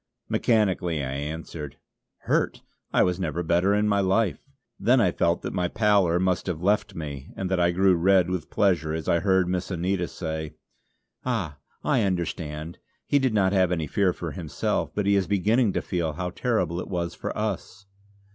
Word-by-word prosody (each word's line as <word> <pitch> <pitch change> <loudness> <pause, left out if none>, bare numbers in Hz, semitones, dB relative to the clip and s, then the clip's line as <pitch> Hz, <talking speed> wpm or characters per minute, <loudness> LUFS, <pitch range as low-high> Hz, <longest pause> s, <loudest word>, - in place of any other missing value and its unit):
Mechanically 95 - +1
I 65 - -3
answered: 75 0 -6 0.4
"Hurt! - - 0 0.3
I - - +4
was 90 +1 0
never 85 -1 -2
better 85 +5 +2
in 105 0 +2
my 100 -1 +2
life," 95 -2 +1 0.4
then - - +4
I - - +3
felt 85 0 0
that - - -4
my 90 -1 0
pallor 100 -4 +3
must 95 0 0
have 85 -2 -3
left 105 +2 +1
me 70 -3 -6
and 95 -1 -3
that 95 - +2
I 85 0 +4
grew 95 +2 +4
red 90 +1 +4
with 90 -4 -3
pleasure 85 -6 +1
as 80 - -5
I 85 - +3
heard 95 0 +2
Miss 90 0 -2
Anita 90 0 -1
say: 80 -2 -5 0.7
"Ah! 95 - -2 0.2
I - - +2
understand. 85 -4 -3 0.3
He 145 - +3
did 130 -5 +1
not 95 -2 +3
have 95 -2 +3
any 80 -3 0
fear 95 +5 +2
for 85 -2 -5
himself; 80 +1 -2
but 105 - 0
he 100 0 +4
is 95 -2 +1
beginning 105 +3 +2
to - - -1
feel 85 -4 -2
how 90 +3 -4
terrible 90 -6 0
it - - -5
was 85 -2 -2
for - - -5
us." 105 -1 -4
90 Hz, 185 wpm, -26 LUFS, 85-100 Hz, 0.7 s, I